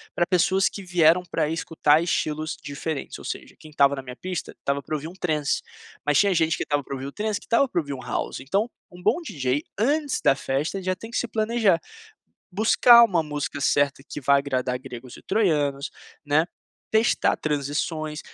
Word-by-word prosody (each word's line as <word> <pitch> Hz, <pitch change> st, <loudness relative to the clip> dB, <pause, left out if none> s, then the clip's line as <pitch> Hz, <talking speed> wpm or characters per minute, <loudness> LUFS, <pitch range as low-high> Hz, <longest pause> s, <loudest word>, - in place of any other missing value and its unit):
pra 175 Hz, -, +2 dB
pessoas 185 Hz, +2 st, +3 dB
que 200 Hz, -, -6 dB
vieram 175 Hz, -1 st, +4 dB
pra 155 Hz, -2 st, 0 dB
escutar 160 Hz, -1 st, +2 dB
estilos 155 Hz, -2 st, -1 dB
diferentes, 145 Hz, +1 st, -5 dB
ou -, -, -11 dB
seja, -, -, -6 dB
quem 155 Hz, -, -13 dB
estava 140 Hz, -1 st, +3 dB
na 135 Hz, -, -5 dB
minha 125 Hz, -1 st, -9 dB
pista, 185 Hz, +1 st, -5 dB
estava 140 Hz, 0 st, -2 dB
pra 155 Hz, -, -4 dB
ouvir 150 Hz, +2 st, -5 dB
um 175 Hz, -, -9 dB
transe, 155 Hz, -6 st, -1 dB, 0.4 s
mas 145 Hz, -1 st, +2 dB
tinha 200 Hz, -2 st, +4 dB
gente 160 Hz, -1 st, +2 dB
que -, -, -1 dB
estava 145 Hz, -1 st, -1 dB
pra 135 Hz, -, -6 dB
ouvir 135 Hz, +1 st, -6 dB
o 140 Hz, -, -5 dB
transe, 210 Hz, +4 st, -2 dB
que -, -, -17 dB
estava 240 Hz, +4 st, +3 dB
pra 175 Hz, -, 0 dB
ouvir 140 Hz, -3 st, -4 dB
um 130 Hz, -, -7 dB
house. -, -, -3 dB
Então, 195 Hz, -, 0 dB, 0.2 s
um 180 Hz, 0 st, -13 dB
bom 345 Hz, -, +2 dB
DJ 145 Hz, -, -2 dB, 0.2 s
antes 285 Hz, +5 st, +1 dB
da -, -, +5 dB
festa 140 Hz, +8 st, -2 dB
já 185 Hz, 0 st, -1 dB
tem 225 Hz, +5 st, -10 dB
que -, -, -2 dB
se 245 Hz, -, -1 dB
planejar, 220 Hz, -4 st, +2 dB, 0.7 s
buscar 235 Hz, +4 st, +7 dB
uma 180 Hz, -7 st, +1 dB
música 145 Hz, -2 st, -4 dB
certa 140 Hz, -1 st, +1 dB
que 145 Hz, -, -7 dB
vá 140 Hz, +1 st, +5 dB
agradar 130 Hz, -2 st, -1 dB
gregos 125 Hz, -1 st, -10 dB
e -, -, -15 dB
troianos, 145 Hz, -9 st, 0 dB, 0.3 s
né, 150 Hz, +3 st, +2 dB, 0.4 s
testar 220 Hz, +2 st, +2 dB
transições, 150 Hz, +1 st, -2 dB
155 Hz, 195 wpm, -24 LUFS, 140-190 Hz, 0.7 s, buscar